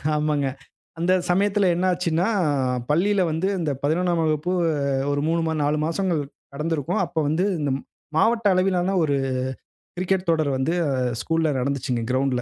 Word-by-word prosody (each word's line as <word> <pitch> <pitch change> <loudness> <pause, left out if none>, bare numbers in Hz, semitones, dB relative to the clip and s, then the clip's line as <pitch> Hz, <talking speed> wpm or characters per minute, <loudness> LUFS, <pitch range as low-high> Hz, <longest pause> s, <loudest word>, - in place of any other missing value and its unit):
ஆமாங்க. 150 -2 0 0.5
அந்த 180 +2 +2 0.2
சமயத்தில 200 +2 +2
என்ன 180 +2 0
ஆச்சுன்னா, 175 +1 0 0.6
பள்ளியில 190 +6 +2
வந்து 160 +4 0
இந்த 155 -4 -1
11ஆம் 170 +2 +1
வகுப்பு 155 +3 0 0.6
ஒரு 145 0 0
3 165 +1 +1
மா 160 - 0
4 150 +1 +1
மாசங்கள் 170 -1 0 0.3
நடந்திருக்கும். 160 +2 -1
அப்போ 165 - -3
வந்து, 170 +6 +1
இந்த 145 -2 0
ம் - - -11 0.3
மாவட்ட 225 +2 +3
அளவிலான 185 0 +1
ஒரு 145 -2 +1 0.8
கிரிக்கெட் 185 0 0
தொடர் 155 -3 +2
வந்து 145 +6 0
அ - - 0 0.3
ஸ்கூல்ல 165 -1 0
நடந்துச்சுங்க. 125 -2 -1
கிரவுண்ட்ல. 130 -1 +1
165 Hz, 145 wpm, -23 LUFS, 150-180 Hz, 0.8 s, மாவட்ட